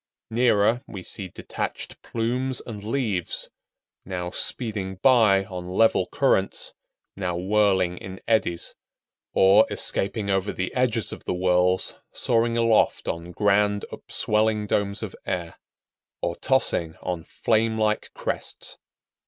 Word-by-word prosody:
Nearer, 115 0 +3
we 95 -4 -8
see 95 +1 -4
detached - - -6
plumes 125 +3 -1
and 105 -4 -8
leaves, 110 -7 -2 0.5
now 90 -2 -4
speeding 105 -6 -2
by 105 -4 +5
on 90 -2 -7
level 110 +5 +3
currents, - - +1 0.4
now 90 -3 -2
whirling 95 -2 +2
in 95 0 -8
eddies, 110 -7 +1 0.6
or, 100 +3 +6
escaping 100 +1 0
over 95 +1 +1
the 90 - -3
edges 120 -5 0
of - - -10
the - - -1
whirls, 90 0 +2
soaring 115 0 +1
aloft 115 -1 +3
on 85 +1 -4
grand, 105 +2 +2
upswelling 105 0 0
domes 100 +1 0
of 105 - -6
air, 85 -3 -4 0.6
or 85 - -2
tossing 85 - +1
on 90 -3 -3
flame 110 +3 +1
like 110 0 +1
crests. - - -4
100 Hz, 120 wpm, -25 LUFS, 90-110 Hz, 0.6 s, or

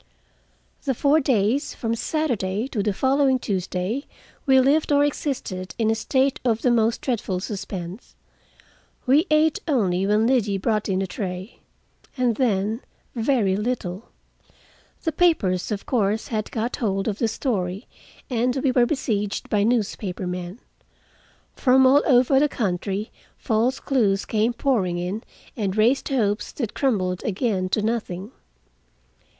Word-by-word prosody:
The 270 -3 0
four 285 +5 +3
days, 255 0 +1
from 225 -1 -2
Saturday 230 -6 -1
to 220 - -1
the 210 +1 +1
following 265 +4 +2
Tuesday, 195 - -2 0.4
we 265 -1 +6
lived, 290 +4 +3
or 285 0 +5
existed, 250 -11 -3
in 220 -1 +2
a - - +3
state 265 +4 +1
of 230 -3 0
the 250 - +4
most 230 -1 +2
dreadful 205 -7 -2
suspense. 190 0 -6 0.9
We 290 +7 +4
ate 305 0 +3
only 195 - +1
when 210 +2 +3
Liddy 225 -6 +2
brought 215 +2 -1
in 190 0 +1
a - - -1
tray, 185 +2 -6 0.6
and 245 -3 +1
then 220 -2 0 0.3
very 225 -5 +1
little. 210 -3 -3 0.9
The 320 - 0
papers, 230 - +1
of 200 -1 -3
course, 220 -3 0
had 215 -2 -2
got 235 +1 -2
hold 195 -3 -1
of 210 -1 -2
the 230 - +2
story, 205 -4 -2 0.4
and 245 0 0
we 270 - +3
were 245 -1 +3
besieged 210 -8 -2
by 210 - +3
newspaper 205 -4 -1
men. 180 +3 -5 1.0
From 265 0 +4
all 275 +3 +6
over 260 0 +5
the 295 +1 +3
country 200 -2 -2 0.3
false 235 +3 0
clues 210 -8 +1
came 225 +2 +1
pouring 220 -9 0
in 180 +5 -3 0.3
and 200 -3 -2
raised 235 +6 +3
hopes 215 -6 0
that 230 -6 -4
crumbled 185 -9 0
again 195 -3 -1
to 210 +2 0
nothing. 215 -3 -3
225 Hz, 140 wpm, -23 LUFS, 195-260 Hz, 1.0 s, we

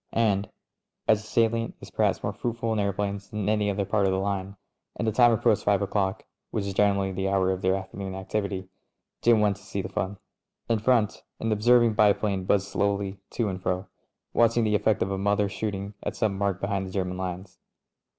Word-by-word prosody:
And 105 -3 +1 0.6
as 110 -1 +4
the 110 - -13
salient 115 0 +1
is - - -11
perhaps - - +1
more - - -1
fruitful 115 -1 -2
in 110 - 0
aeroplanes 100 0 -2
than 105 -2 -3
any 105 -1 +2
other 100 0 -1
part 100 0 +2
of - - +2
the 95 - +1
line, 100 0 -2 0.4
and - - -2
the - - +3
time 120 +2 +5
approached 110 -2 +2
five 100 -1 +2
o'clock 95 -1 -1 0.2
(which 105 - -2
is 100 - -3
generally 100 -1 +2
the 95 +1 -1
hour 95 -1 +2
of 95 0 -3
their 95 0 +2
afternoon 95 0 -5
activ 95 +2 -2
ity), 95 -1 -5 0.5
Jim 115 -2 +5
went 105 -2 +2
to - - -18
see - - -4
the - - -5
fun. 100 +2 -3 0.5
In 115 -2 +1
front, 110 -2 +2 0.2
an 115 - -1
observing 120 +2 +4
biplane 100 -2 +2
buzzed 100 +1 +2
slowly 100 -1 -1
to 115 - -1
and 95 -2 -4
fro, 90 +1 -2 0.4
watching 115 0 +4
the 105 -1 +1
effect 105 0 +2
of 95 - -3
a 95 - -2
mother 100 +1 +2
^ - - -12
shooting 100 -1 -4
at - - -4
some 105 -3 0
mark 100 -2 -1
behind 100 -1 -1
the - - -8
German 90 -1 -2
lines. 90 0 -5
100 Hz, 210 wpm, -26 LUFS, 95-110 Hz, 0.6 s, time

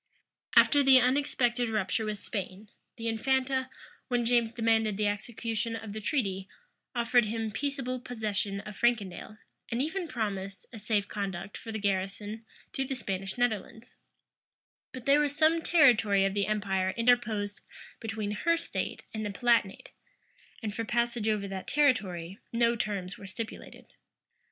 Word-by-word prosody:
[*] - - -18
After 290 - +7
the 270 -1 +7
unexpected 245 -2 +1
rupture 215 0 0
with 215 -1 -2
Spain, 200 0 -6 0.3
the 230 -1 -5
infanta, 260 +3 +1 0.4
when 245 -2 +1
James 235 -1 +3
demanded 225 -3 +2
the 210 - +1
execution 225 +2 -2
of 225 -2 -6
the 215 - -5
treaty, 195 -5 -1 0.5
offered 240 0 +4
him 225 0 -2
peaceable 265 +1 -2
possession 210 -5 -2
of 210 -1 -9
Frankendale, 215 -3 0 0.3
and 235 - -1
even 330 +6 -1
promised 200 -6 -4
a 225 - -7
safe 210 -1 0
conduct 195 -1 -4
for 225 - -7
the 220 - -3
garrison 200 +2 -2 0.3
through 270 - -1
the 270 - -3
Spanish 195 -3 -4
Netherlands: 225 -1 -2 1.0
but 255 -1 -9
there 280 +1 +5
was 290 0 0
some 320 +1 +4
territory 220 - +5
of 195 - 0
the 200 -1 0
empire 195 -3 0
interposed 230 -4 +2 0.4
between 220 -2 -3
her 335 +11 +2
state - - -4
and 215 -1 -3
the 210 - -2
Palatinate; 230 -2 +1 0.7
and 210 -2 -2
for 230 - -2
passage 235 -1 0
over 210 -2 0
that 195 -1 -6
territory, 200 - +1
no 235 0 +3
terms 200 -5 -3
were 200 - -9
stipulated. 220 +4 -7
220 Hz, 150 wpm, -30 LUFS, 205-245 Hz, 1.0 s, After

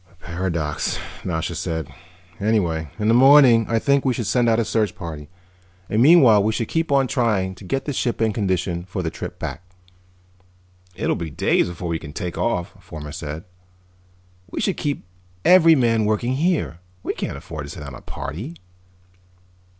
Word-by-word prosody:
"A - - -24
paradox," 85 -3 -2 0.3
Nasha 80 -3 -2
said. 80 -3 -3 0.5
"Anyhow, 90 -7 0
in 105 -1 -1
the 115 - +5
morning 130 -3 +7
I 115 - +2
think 140 +4 +2
we 130 -3 +1
should 115 - -3
send 120 +1 +2
out 110 - +3
a 115 - +1
search 105 -3 0
party. 75 -3 -7 0.6
And 110 - +2
meanwhile 130 -8 +7
we 110 +1 +1
should 115 0 -2
keep 165 -2 -1
on 135 -1 +4
trying 110 -8 0
to 95 - -14
get 135 +9 -2
the 145 - -2
ship 120 -2 -1
in 110 -1 +1
condition 95 -4 -1
for 95 0 -4
the 80 - -2
trip - - -7
back." - - -5 1.3
"It'll - - 0
be 85 -2 -4
days 70 - +1
before 85 0 -5
we 80 -1 -1
can 75 -2 -10
take 90 +1 -4
off," 90 -7 -1
Fomar 75 -2 -8
said. 75 0 -6 1.1
"We - - -5
should 195 - 0
keep 145 -2 -2 0.4
every 165 -3 +7
man 115 -5 +2
working 110 +4 0
here. 150 - 0 0.2
We - - -2
can't - - -4
afford 75 -3 -7
to - - -10
send 75 - -8
out 70 - -8
a - - -10
party." 115 - -6
105 Hz, 180 wpm, -22 LUFS, 85-125 Hz, 1.3 s, morning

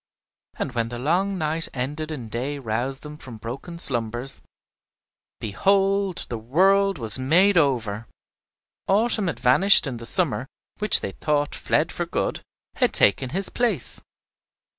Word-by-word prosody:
And - - -3
when 115 -2 -2
the 120 - -6
long 180 +9 0
night 160 0 -1
ended 145 +5 -4
and 125 -8 -7
day 130 +6 -3
roused 125 +2 -4
them 150 0 -9
from 125 -6 -11
broken 130 +10 -8
slumbers, 120 -2 -2 1.0
behold, 195 - 0
the 120 - -5
world 195 - +2
was 115 -2 +2
made 180 +10 +3
over! 120 -8 0 0.8
Autumn 210 0 +1
had 145 -8 -4
vanished, 130 +13 +7
and 125 -4 -5
the 115 - -4
summer, 145 -7 0 0.3
which 210 0 +5
they 100 - -4
thought 145 +6 -1
fled - - 0
for - - -4
good, - - -3 0.4
had - - +1
taken 130 +6 +3
his 190 +7 0
place. 225 - -1
145 Hz, 140 wpm, -23 LUFS, 120-185 Hz, 1.0 s, vanished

